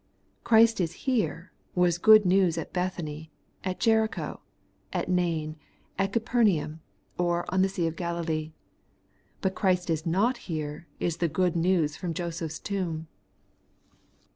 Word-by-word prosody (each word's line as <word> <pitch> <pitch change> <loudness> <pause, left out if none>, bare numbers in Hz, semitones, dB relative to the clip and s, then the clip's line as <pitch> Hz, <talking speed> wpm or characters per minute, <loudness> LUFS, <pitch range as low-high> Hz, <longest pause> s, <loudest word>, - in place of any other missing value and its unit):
Christ 225 -2 +5
is 170 -1 -1
here, 220 -10 0 0.2
was 175 -1 +3
good 215 +1 +7
news 180 -2 +3
at 165 - -5
Bethany, 165 -4 -3 0.3
at 185 -1 -3
Jericho, 220 -1 +1 0.5
at - - -2
Nain, 165 -4 0 0.4
at 195 0 +1
Capernaum, 210 -9 +1 0.4
or 175 0 +1
on 190 - +3
the 190 - +3
sea 185 -3 -1
of 165 0 -2
GaUlee; 165 -3 -2 0.9
but 190 -1 0
Christ 180 -2 +1
is 160 -1 -1
not 210 +9 +2
here, 155 0 -4
is 170 -1 -1
the 170 -1 +1
good 180 +2 +1
news 170 -3 +2
from 170 -3 -4
Joseph's 165 -2 -4
tomb. 170 -6 -3
175 Hz, 135 wpm, -27 LUFS, 165-190 Hz, 0.9 s, good